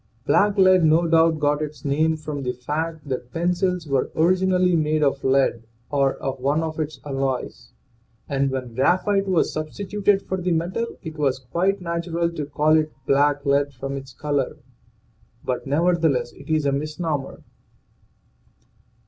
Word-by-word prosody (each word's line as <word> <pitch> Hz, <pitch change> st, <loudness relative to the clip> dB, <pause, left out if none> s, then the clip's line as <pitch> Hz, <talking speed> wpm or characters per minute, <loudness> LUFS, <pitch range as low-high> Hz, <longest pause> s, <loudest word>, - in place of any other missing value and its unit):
Black 205 Hz, 0 st, +3 dB
lead 185 Hz, -2 st, +6 dB
no 160 Hz, +2 st, +4 dB
doubt 165 Hz, -1 st, +4 dB
got 145 Hz, 0 st, +1 dB
its 150 Hz, -1 st, -6 dB
name 155 Hz, +3 st, +1 dB
from 150 Hz, -2 st, -5 dB
the 125 Hz, -2 st, -2 dB
fact 155 Hz, +5 st, -4 dB
that 125 Hz, -2 st, -4 dB
pencils 180 Hz, +1 st, 0 dB
were 135 Hz, -3 st, 0 dB
originally 180 Hz, +1 st, +3 dB
made 155 Hz, -1 st, +1 dB
of 140 Hz, -1 st, +1 dB
lead 130 Hz, -3 st, +2 dB, 0.3 s
or 140 Hz, -2 st, +2 dB
of 135 Hz, -1 st, -4 dB
one 145 Hz, +5 st, +1 dB
of 160 Hz, 0 st, -4 dB
its 155 Hz, -3 st, -3 dB
alloys, 135 Hz, -2 st, -3 dB, 0.6 s
and 140 Hz, -1 st, 0 dB
when 130 Hz, -3 st, -4 dB
graphite 190 Hz, -, +2 dB
was 185 Hz, -3 st, +1 dB
substituted 195 Hz, +5 st, 0 dB
for 190 Hz, -1 st, -3 dB
the 180 Hz, -1 st, 0 dB
metal 185 Hz, +8 st, -2 dB
it 160 Hz, -2 st, -7 dB
was 135 Hz, -3 st, +1 dB
quite 180 Hz, +10 st, -1 dB
natural 170 Hz, 0 st, -2 dB
to 150 Hz, -4 st, -5 dB
call 150 Hz, +2 st, +2 dB
it 155 Hz, 0 st, 0 dB
black 145 Hz, +1 st, +2 dB
lead 140 Hz, +1 st, +2 dB
from 135 Hz, +2 st, -5 dB
its 135 Hz, -1 st, -7 dB
color. 145 Hz, +1 st, -2 dB, 0.9 s
But 125 Hz, +1 st, -2 dB
nevertheless 155 Hz, -4 st, +1 dB
it 140 Hz, -, -14 dB
is 155 Hz, -2 st, +1 dB
a 140 Hz, -, +2 dB
misnomer. 150 Hz, 0 st, -3 dB
155 Hz, 155 wpm, -23 LUFS, 140-170 Hz, 0.9 s, lead